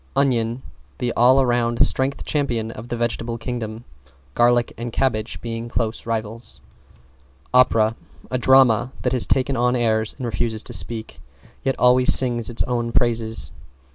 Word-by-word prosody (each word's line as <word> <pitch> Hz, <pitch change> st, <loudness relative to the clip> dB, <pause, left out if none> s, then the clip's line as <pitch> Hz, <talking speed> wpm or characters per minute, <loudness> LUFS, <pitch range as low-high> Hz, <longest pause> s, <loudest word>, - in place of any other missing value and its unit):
=ONION= 125 Hz, -3 st, 0 dB, 0.3 s
The 120 Hz, -1 st, -2 dB
all 130 Hz, +3 st, +4 dB
round 120 Hz, -1 st, +1 dB
strength 135 Hz, +1 st, -1 dB
champion 120 Hz, -7 st, -2 dB
of 115 Hz, +2 st, -10 dB
the 120 Hz, -, -3 dB
Vegetable 115 Hz, 0 st, -3 dB
Kingdom, 115 Hz, -2 st, -6 dB, 0.5 s
garlic 120 Hz, 0 st, +2 dB
and 120 Hz, 0 st, -6 dB
cabbage 115 Hz, -3 st, -2 dB
being 115 Hz, 0 st, -5 dB
close 115 Hz, -1 st, -3 dB
rivals. 115 Hz, +1 st, -5 dB, 0.9 s
=OPERA= 115 Hz, -3 st, +3 dB, 0.4 s
A 130 Hz, -, -1 dB
drama 130 Hz, -2 st, +4 dB
that -, -, 0 dB
has 125 Hz, -, +2 dB
taken 135 Hz, +1 st, +1 dB
on 125 Hz, 0 st, +1 dB
airs 110 Hz, -2 st, 0 dB
and 130 Hz, -, -5 dB
refuses 110 Hz, 0 st, -2 dB
to -, -, -7 dB
speak, 115 Hz, -2 st, -4 dB, 0.4 s
yet 135 Hz, -, 0 dB
always 125 Hz, +1 st, +6 dB
sings 120 Hz, -3 st, +3 dB
its 120 Hz, -, -1 dB
own 120 Hz, -1 st, -2 dB
praises. 115 Hz, -2 st, 0 dB
120 Hz, 145 wpm, -21 LUFS, 115-125 Hz, 0.9 s, always